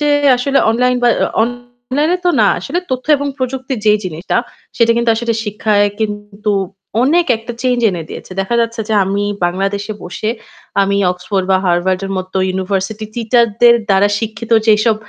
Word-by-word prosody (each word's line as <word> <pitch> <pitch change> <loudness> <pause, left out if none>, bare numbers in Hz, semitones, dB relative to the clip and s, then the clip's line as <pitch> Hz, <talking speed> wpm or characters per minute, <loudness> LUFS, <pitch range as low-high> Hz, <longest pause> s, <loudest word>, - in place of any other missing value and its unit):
চে 295 - +1 0.3
আসলে 275 +3 +1
online 250 +2 +2
বা 245 - +5 0.3
অ - - +4
online 245 +5 -3
এ - - +1
তো 355 - +4
না। - - +5
আসলে 350 - -3
তথ্য 255 0 -3
এবং 285 0 -3
প্রযুক্তির 260 0 -3
যেই 210 0 +5
জিনিসটা 170 0 -3 0.4
সেটা 230 -1 +3
কিন্তু 235 0 +2
আসলে 235 +1 -1
শিক্ষায় 210 -1 +1
কিন্তু 205 0 -3 0.5
অনেক 335 +6 +3
একটা 225 +2 -8
change 250 -2 +1
এনে 175 -3 -4
দিয়েছে। - - -9
দেখা 195 +5 -2
যাচ্ছে 230 0 -2
যে 220 - +1
আমি 200 +2 -1 0.2
বাংলাদেশে 195 +4 -1
বসে 180 +4 -4 0.5
আমি 200 0 +1 0.2
Oxford 185 +2 -3
বা 190 - +5
Harvard 180 +1 +1
এর - - -6
মতো 185 +1 -6 0.2
university 195 +3 -2
teacher 235 0 +3 0.2
দের 240 0 +8
দ্বারা 195 +1 +4
শিক্ষিত 225 +1 -6 0.2
যেসব 220 +1 +4
220 Hz, 170 wpm, -16 LUFS, 195-245 Hz, 0.5 s, দের